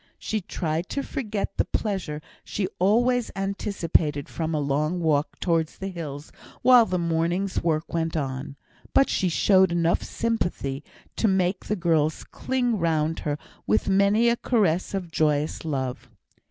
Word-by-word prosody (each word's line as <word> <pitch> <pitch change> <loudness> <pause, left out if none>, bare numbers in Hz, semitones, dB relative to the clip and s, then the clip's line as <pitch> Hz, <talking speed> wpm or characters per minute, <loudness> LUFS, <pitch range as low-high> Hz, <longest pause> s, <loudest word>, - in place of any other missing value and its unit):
She 215 -1 -2
tried 165 -1 -3
to 280 - -2
forget 215 -8 -3
the - - +2
pleasure 180 -8 -3 0.2
she 195 -2 -2
always 235 +5 +3
anticipated 195 -7 0
from 160 -1 -3
a - - +1
long 150 +5 0
walk 155 -3 0
towards 165 -3 0
the 195 - -4
hills, 150 -5 -7 0.3
while 245 -2 +7
the 185 - 0
morning's 170 +3 0
work 160 -1 -1
went 165 -1 -1
on; 135 -1 -4 0.4
but 270 - +5
she 185 - +1
showed 190 +1 +4
enough 170 0 +2
of - - -7
sympathy 175 -11 -2 0.3
to 225 - +2
make 190 -1 +1
the 210 - 0
girls 160 -4 +1
cling 245 -4 -1
round 160 -1 +1
her 145 -1 -2 0.3
with 105 - +2
many 200 +4 +4
a 235 0 +3
caress 195 -7 +1
of 180 -4 -4
joyous 150 -1 0
love. 135 -5 -3
170 Hz, 155 wpm, -25 LUFS, 155-200 Hz, 0.4 s, while